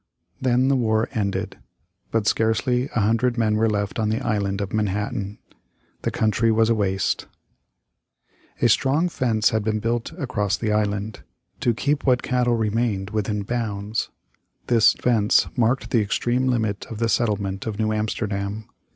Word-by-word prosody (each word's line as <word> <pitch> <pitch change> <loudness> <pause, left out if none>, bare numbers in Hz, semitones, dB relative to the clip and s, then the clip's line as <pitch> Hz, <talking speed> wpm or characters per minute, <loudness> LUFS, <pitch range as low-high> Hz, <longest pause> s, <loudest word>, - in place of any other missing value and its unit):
Then 130 0 +2
the 135 - +3
war 110 -3 +1
ended. 100 -3 -2 0.5
But 115 -2 0
scarcely 125 +4 +1
a 115 - +2
hundred 115 +4 +1
men 110 -2 +2
were 110 +1 +2
left 105 0 -2
on 110 -1 +1
the 110 - 0
Island 100 -3 -1
of 100 -2 -4
Manhattan. 105 -1 -2 0.6
The - - -1
country 110 +1 +1
was 110 +1 +3
a - - +5
waste. 95 -3 0 1.4
A - - +7
strong 140 +9 +2
fence 115 -8 +1
had 110 -1 0
been 110 0 0
built 115 +4 -2
across 110 - -1
the 110 -2 -1
island, 105 0 -1 0.4
to 120 -2 +1
keep 145 +4 0
what 125 -2 +2
cattle 125 -2 +1
remained 110 -3 -1
within 105 -1 -1
bounds. 105 -2 -2 0.6
This 115 -3 +5
fence 110 -4 +3
marked 125 +2 +1
the 115 - +3
extreme 120 +5 0
limit 110 -5 -1
of 115 - -7
the 115 +1 0
settlement 105 -3 -1
of 105 -2 -3
New 110 0 0
Amsterdam. 105 -1 -3
110 Hz, 155 wpm, -23 LUFS, 105-120 Hz, 1.4 s, A